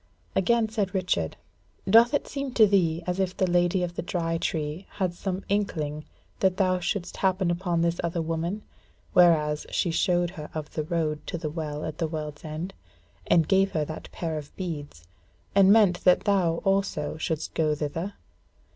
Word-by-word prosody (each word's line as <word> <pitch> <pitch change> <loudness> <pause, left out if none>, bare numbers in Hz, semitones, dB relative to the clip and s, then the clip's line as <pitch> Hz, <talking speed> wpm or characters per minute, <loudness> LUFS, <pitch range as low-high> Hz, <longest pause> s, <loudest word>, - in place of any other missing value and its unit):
Again 230 +4 +3
said 210 -3 -2
Richard: 130 - 0 0.5
"Doth 230 +7 +6
it - - -1
seem 275 -2 -4
to 220 - +7
thee 175 -5 +2
as 180 +1 -2
if 185 -1 -1
the 190 - +3
Lady 175 +1 +2
of 175 -1 -3
the - - -2
Dry 165 -1 -2
Tree 155 +3 -3
had 185 -3 -1
some 185 +2 -4
inkling 155 -7 -1 0.3
that 190 -1 +2
thou 185 -2 +2
shouldst 180 0 -3
happen 185 -2 +1
upon 175 -1 0
this 170 0 0
other 170 0 -1
woman: 165 +5 -2 0.5
whereas 155 -4 +4
she 175 - 0
showed 175 0 +1
her 155 -5 -8
of 155 -2 -5
the 155 - -1
road 155 -2 -1
to - - -3
the 155 -3 -4
Well 150 -2 -4
at 155 -1 -6
the 165 - +1
World's 150 -2 -6
End, 160 +4 -5 0.5
and 165 -3 +4
gave 195 0 +3
her 155 -2 0
that 155 +1 -8
pair 160 -3 -3
of 145 - -11
beads, 145 - -6 0.5
and 195 -1 +6
meant 205 -5 +4
that 180 -1 +5
thou 180 -5 +1
also 195 -7 0
shouldest 160 0 -3
go 155 -2 +1
thither? 165 +7 -4
175 Hz, 180 wpm, -26 LUFS, 155-190 Hz, 0.5 s, to